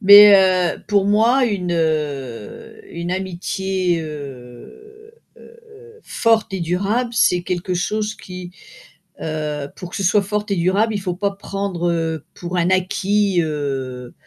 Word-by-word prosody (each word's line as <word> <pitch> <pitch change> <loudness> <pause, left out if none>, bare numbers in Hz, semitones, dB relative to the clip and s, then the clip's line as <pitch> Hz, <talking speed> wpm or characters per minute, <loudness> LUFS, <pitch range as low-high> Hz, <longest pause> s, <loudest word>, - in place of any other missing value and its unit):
Mais 205 0 +10
heu, 185 -2 +4
mais - - -19
pour 200 -1 +2
moi, 230 +6 +4
une 185 -6 -1
heu, 145 -8 -3
une 170 +1 -5
amitié, 185 -1 -2
heu, 155 - -10 0.9
forte 225 -3 +1
et 185 - -3
durable, 200 +8 0
c'est 180 -5 +3
quelque 180 0 -3
chose 210 +4 -1
qui, 180 -2 -9 0.7
heu, 150 -2 -3
pour 180 -1 -9
que - - -6
ce 195 - -2
soit 200 +3 +3
forte 210 +1 -3
et - - +2
durable, 195 +6 +1
il 200 - -2
faut 180 -2 -2
pas 200 +2 0
prendre, 195 -3 -3
heu, 165 -2 -2
pour 175 +1 -5
un 175 +1 +2
acquis, 190 +1 +1
heu 135 -5 -4
180 Hz, 145 wpm, -20 LUFS, 165-205 Hz, 0.9 s, Mais